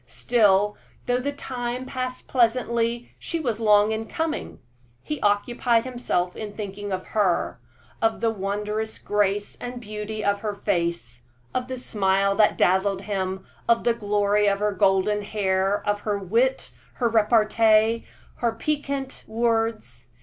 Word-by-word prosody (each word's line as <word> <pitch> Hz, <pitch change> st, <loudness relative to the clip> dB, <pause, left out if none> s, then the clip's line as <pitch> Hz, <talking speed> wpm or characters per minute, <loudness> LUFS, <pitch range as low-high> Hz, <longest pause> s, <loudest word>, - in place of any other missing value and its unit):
Still, 210 Hz, -3 st, +2 dB, 0.3 s
though 245 Hz, 0 st, +1 dB
the 280 Hz, +3 st, -2 dB
time 250 Hz, -2 st, -4 dB
passed 255 Hz, -1 st, -4 dB
pleasantly, 235 Hz, -1 st, +1 dB
she 335 Hz, -, -3 dB
was 235 Hz, -8 st, -2 dB
long 210 Hz, -1 st, +4 dB
in 220 Hz, 0 st, -3 dB
coming. 320 Hz, -1 st, -3 dB, 0.5 s
He 300 Hz, -, -4 dB
occupied 230 Hz, +3 st, +2 dB
himself 240 Hz, -8 st, -1 dB
in 210 Hz, -2 st, -6 dB
thinking 205 Hz, -1 st, -5 dB
of 185 Hz, -1 st, -4 dB
her 195 Hz, -5 st, +1 dB, 0.4 s
of 225 Hz, 0 st, +1 dB
the 230 Hz, -, +1 dB
wondrous 210 Hz, +2 st, -3 dB
grace 205 Hz, 0 st, 0 dB
and 245 Hz, 0 st, -5 dB
beauty 215 Hz, -1 st, -5 dB
of 200 Hz, 0 st, +2 dB
her 210 Hz, -1 st, -3 dB
face, 170 Hz, -9 st, -2 dB, 0.3 s
of 250 Hz, 0 st, -2 dB
the 260 Hz, 0 st, -4 dB
smile 195 Hz, -4 st, +1 dB
that 210 Hz, +1 st, +3 dB
dazzled 190 Hz, +1 st, +2 dB
him, 190 Hz, -2 st, -3 dB, 0.2 s
of 230 Hz, 0 st, +4 dB
the 235 Hz, -, +3 dB
glory 205 Hz, -1 st, +1 dB
of 200 Hz, 0 st, +3 dB
her 210 Hz, +1 st, 0 dB
golden 195 Hz, +2 st, +2 dB
hair, 200 Hz, -1 st, 0 dB
of 205 Hz, 0 st, 0 dB
her 205 Hz, -1 st, -1 dB
wit, 230 Hz, +7 st, 0 dB, 0.2 s
her 240 Hz, -, 0 dB
repartee, 220 Hz, 0 st, +3 dB, 0.3 s
her 235 Hz, -2 st, 0 dB
piquant 280 Hz, +1 st, -3 dB
words. 225 Hz, -, -1 dB
215 Hz, 140 wpm, -24 LUFS, 200-235 Hz, 0.5 s, long